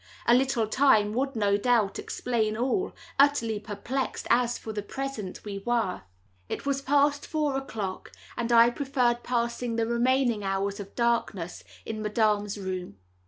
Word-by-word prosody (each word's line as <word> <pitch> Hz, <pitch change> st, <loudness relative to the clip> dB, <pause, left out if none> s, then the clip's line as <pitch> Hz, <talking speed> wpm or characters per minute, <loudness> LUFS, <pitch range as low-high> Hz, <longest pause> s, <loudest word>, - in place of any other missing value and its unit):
A 235 Hz, -, +5 dB
little 255 Hz, -2 st, +3 dB
time 215 Hz, -3 st, +3 dB
would, 270 Hz, +3 st, -1 dB
no 200 Hz, -2 st, +2 dB
doubt, 220 Hz, -3 st, +2 dB
explain 220 Hz, -3 st, -1 dB
all—utterly 265 Hz, -, +1 dB
perplexed 235 Hz, +6 st, -4 dB
as, 240 Hz, 0 st, +3 dB
for 220 Hz, -, -7 dB
the 210 Hz, -, -2 dB
present, 220 Hz, -5 st, -5 dB
we 200 Hz, -1 st, -4 dB
were. 230 Hz, -3 st, -1 dB, 0.5 s
It -, -, -4 dB
was 275 Hz, -1 st, 0 dB
past 285 Hz, +1 st, +2 dB
four 300 Hz, -3 st, 0 dB
o'clock, 220 Hz, -8 st, -4 dB, 0.2 s
and 235 Hz, 0 st, -2 dB
I 235 Hz, 0 st, +7 dB
preferred 250 Hz, -3 st, 0 dB
passing 235 Hz, -1 st, -1 dB
the 230 Hz, 0 st, +1 dB
remaining 240 Hz, -1 st, +1 dB
hours 195 Hz, +1 st, -1 dB
of 200 Hz, -1 st, -9 dB
darkness 230 Hz, -7 st, -1 dB, 0.2 s
in 220 Hz, -1 st, -4 dB
Madame's 210 Hz, -1 st, +1 dB
room. 185 Hz, -, -5 dB
235 Hz, 145 wpm, -27 LUFS, 210-260 Hz, 0.5 s, I